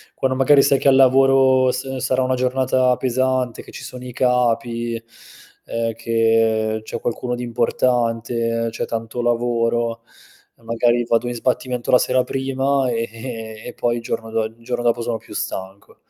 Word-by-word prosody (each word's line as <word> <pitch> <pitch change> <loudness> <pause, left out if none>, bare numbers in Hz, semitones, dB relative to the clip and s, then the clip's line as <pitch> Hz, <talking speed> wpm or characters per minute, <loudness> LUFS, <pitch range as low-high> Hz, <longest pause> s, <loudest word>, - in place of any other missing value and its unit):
quando 130 -1 0
magari 140 +1 +5
sai 135 -2 +3
che - - 0
al 135 - +6
lavoro 130 -1 +5
s 130 +1 -4
sarà 130 0 0
una 130 0 +1
giornata 130 0 +2
pesante, 130 -1 0
che - - -14
ci - - -9
sono 125 0 -9
i 125 - -7
capi, 120 -2 0 0.7
ehm, 115 0 -2
che 115 -1 +1
c'è - - -6
qualcuno 125 +1 -3
di 125 - -5
importante, 115 -1 0
c'è 110 - -3
tanto 115 +1 -4
lavoro, 120 -1 0 0.6
e 115 - -26
magari 120 +1 +1
vado 115 +1 +1
in 120 - -2
sbattimento 125 0 -2
la 125 - +8
sera 130 0 +2
prima 135 0 0
e 115 -1 -2 0.6
e, 125 - -7
poi 120 0 0
il - - -5
giorno 115 -1 -4 0.5
dopo 120 0 +1
sono 115 -1 -2
più - - -14
stanco. 95 +2 -6
120 Hz, 155 wpm, -20 LUFS, 115-130 Hz, 0.7 s, la